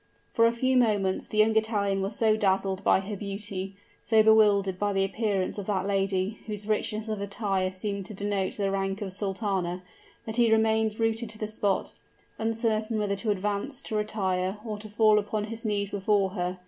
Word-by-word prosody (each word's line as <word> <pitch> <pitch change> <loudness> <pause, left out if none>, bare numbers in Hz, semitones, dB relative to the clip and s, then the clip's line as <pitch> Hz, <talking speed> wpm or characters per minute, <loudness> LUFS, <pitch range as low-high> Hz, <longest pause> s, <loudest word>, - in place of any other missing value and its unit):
For 230 -1 +5
a - - +3
few 255 +2 +1
moments 205 -6 +1
the 215 - -5
young 215 +1 +4
Italian 205 -3 +1
was 195 +2 -2
so 220 -2 +3
dazzled 195 -2 0
by 190 - +4
her 205 +2 -5
beauty, 195 -1 -5 0.3
so 220 -1 +4
bewildered 205 -4 +4
by 205 -1 0
the 195 0 +2
appearance 200 -1 -1
of 195 - -6
that 195 -3 0
lady, 195 +1 0
whose 210 -1 -5
richness 215 0 -1
of 215 -2 -3
attire 200 -2 -1
seemed 200 0 -3
to 210 - -8
denote 200 -1 -2
the 200 -2 0
rank 195 +1 -2
of 190 -2 -5
sultana, 190 -3 -2 0.4
that 220 +1 -5
he 235 -2 +4
remained 220 0 +2
rooted 225 0 0
to 215 - -5
the 215 - -3
spot, 205 -2 -1 0.5
uncertain 225 0 0
whether 205 -1 0
to 220 - -2
advance, 210 +7 -2
to 220 - -4
retire, 195 -3 -1
or 215 -2 -4
to 215 0 -9
fall 215 0 +4
upon 210 +1 -2
his 225 +2 -6
knees 200 -1 -1
before 200 -1 +1
her. 180 -1 -3
205 Hz, 190 wpm, -27 LUFS, 195-220 Hz, 0.5 s, For